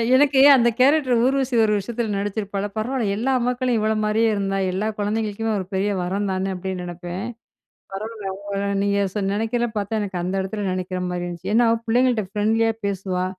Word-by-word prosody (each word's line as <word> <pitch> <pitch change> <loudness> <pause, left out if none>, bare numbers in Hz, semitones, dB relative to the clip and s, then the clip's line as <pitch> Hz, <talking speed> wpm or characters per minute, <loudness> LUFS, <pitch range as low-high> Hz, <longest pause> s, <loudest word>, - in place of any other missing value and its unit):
எனக்கு 275 0 +4 0.2
அந்த 240 -2 +4
கேரக்டர் 260 -3 +4
ஊர்வசி 265 -1 +1
ஒரு 215 -1 +2
விஷயத்தில 220 +2 -3
நடித்திருப்பாள, 200 0 -3
பரவாயில்ல 220 -3 -1
எல்லா 260 +5 0
மக்களும் 250 -1 0
இவள 215 +1 +1
மாரியே 220 +2 +2
இருந்தா, 195 -1 -1
எல்லா 195 +4 -1
குழந்தைகளுக்குமே 215 +1 -1
ஒரு 190 - -4
பெரிய 195 +2 +1
வரம் 195 +3 -1
தானே! 190 +1 -1
அப்பிடின்னு 185 0 -4
நினைப்பேன். 175 +2 -6 0.7
பரவால்ல. 210 0 -5
உங்க 200 0 -5 0.3
நீங்க 200 0 +1 0.2
ச 210 - -2
நினைக்கிறத 230 +3 0
பார்த்தா 210 +2 -1
எனக்கு 190 -3 -3
அந்த 180 +2 -2
இடத்தில 200 +2 -4
நினைக்கிறமாரி 180 -1 -3
இருந்துச்சு. 175 +2 -5
ஏன்னா, 235 0 +5 0.2
பிள்ளைங்கட்ட 240 -2 +2
ஃப்ரெண்ட்லியா 225 +2 +2 0.2
பேசுவா! 185 -2 -2
210 Hz, 160 wpm, -22 LUFS, 190-230 Hz, 0.7 s, ஏன்னா